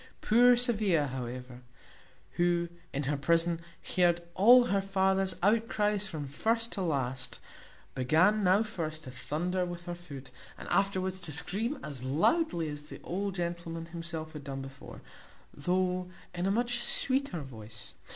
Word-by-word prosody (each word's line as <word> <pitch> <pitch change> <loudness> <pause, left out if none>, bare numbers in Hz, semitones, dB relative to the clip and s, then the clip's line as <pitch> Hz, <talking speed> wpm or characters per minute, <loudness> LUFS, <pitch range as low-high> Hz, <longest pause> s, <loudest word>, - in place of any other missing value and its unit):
Poor 245 +2 +5
Sophia, 210 - +3
however, 125 -1 -6 0.7
who, 175 0 +1 0.2
in 140 - -2
her 145 +2 0
prison, 165 +4 +2 0.4
heard 175 -1 +3
all 245 +7 +7
her 200 -4 +1
father's 190 0 +1
outcries 210 -1 +2
from 155 -6 -5
first 225 - 0
to 195 - -3
last, 135 -7 -2 0.5
began 170 +11 +3
now 190 +4 +4
first 160 -7 -4
to 130 - -8
thunder 170 +8 -2
with 175 -1 -5
her 175 - -4
foot, 140 -7 -10 0.3
and - - -9
afterwards 190 -1 +1
to 175 -4 -5
scream 205 - -1
as 135 -4 -4
loudly 170 - +1
as 145 -1 -5
the - - -10
old 195 +2 -3
gentleman 170 -2 -4
himself 165 -1 -6
had 150 -2 -8
done 135 -1 -5
before, 135 0 -11 0.5
though 180 +3 0 0.2
in 180 +1 -1
a - - +2
much 240 +3 0
sweeter 260 - +2
voice. 110 -5 -10
175 Hz, 145 wpm, -30 LUFS, 145-195 Hz, 0.7 s, all